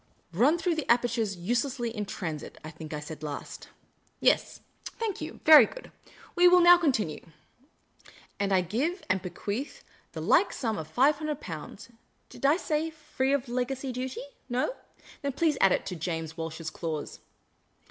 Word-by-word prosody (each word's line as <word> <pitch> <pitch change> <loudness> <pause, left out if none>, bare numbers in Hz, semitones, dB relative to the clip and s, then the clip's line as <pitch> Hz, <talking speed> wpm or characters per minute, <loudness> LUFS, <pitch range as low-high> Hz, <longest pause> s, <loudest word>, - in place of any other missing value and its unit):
' - - -41
Run 300 +6 +5
through 345 0 0
the 315 -6 0
apertures 235 -4 +1
uselessly 240 +5 -1
in 210 -2 -3
transit,' 160 -8 -5
I 155 - -7
think 155 -1 -10
I 150 - -3
said 150 0 -8
last. 150 -2 -7 0.5
Yes, - - +2 0.2
thank 450 -4 -4
you. - - -7
Very 310 -1 +10
good. - - -11 0.4
We 355 0 +6
will 360 0 +7
now 350 0 +9
continue. 220 - 0 1.2
And 200 -1 0
I 190 -1 +4
give 265 - -2
and 190 0 0
be 180 - -5
quealh 205 +9 -5 0.3
the - - -5
like - - +3
sum 225 -7 -2
of 155 - -6
Five 270 - +3
Hundred 305 -2 -3
Pounds 170 +6 -8 0.2
— - - -43
did 275 - -1
I 295 +4 +4
say, 315 -2 -1
free 300 -4 -2
of 280 -2 0
legacy 255 +2 -2
duty? 255 +1 -4 0.3
No? 250 - 0 0.5
Then 280 -2 -2
please 310 +1 +2
add 195 - +6
it - - +1
to 180 - -4
James 160 -1 -4
Walsh's 160 -1 -5
clause. 155 -3 -5
240 Hz, 175 wpm, -28 LUFS, -, 1.2 s, Very